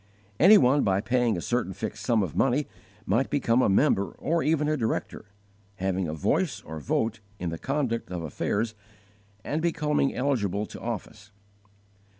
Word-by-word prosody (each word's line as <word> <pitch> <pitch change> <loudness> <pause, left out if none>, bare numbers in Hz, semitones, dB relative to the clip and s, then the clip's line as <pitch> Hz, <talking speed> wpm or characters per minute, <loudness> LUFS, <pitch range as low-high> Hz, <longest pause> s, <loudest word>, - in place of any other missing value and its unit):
Any 200 +6 +8
one 135 0 +4
by 95 -1 +2
paying 120 -1 +1
a - - -4
certain 120 -4 -1
fixed 105 +3 -5
sum 115 -4 +2
of 90 - -5
money 135 +3 +2 0.4
might 115 +8 +1
become 125 -4 +2
a - - +3
member 100 -2 +3
or 165 +3 -1
even 150 -1 +1
a 155 - +1
director, 110 -4 -3 0.5
having 95 -1 -1
a 75 - -3
voice 75 - 0
or 80 0 -7
vote 110 - -1 0.2
in 90 -3 -3
the 80 - -5
conduct 135 -7 -2
of 90 -2 -4
affairs 105 +8 -2 0.7
and 155 +2 -2
becoming 150 -4 0
eligible 105 -7 0
to - - -10
office. 110 -3 -6
115 Hz, 160 wpm, -27 LUFS, 95-140 Hz, 0.7 s, Any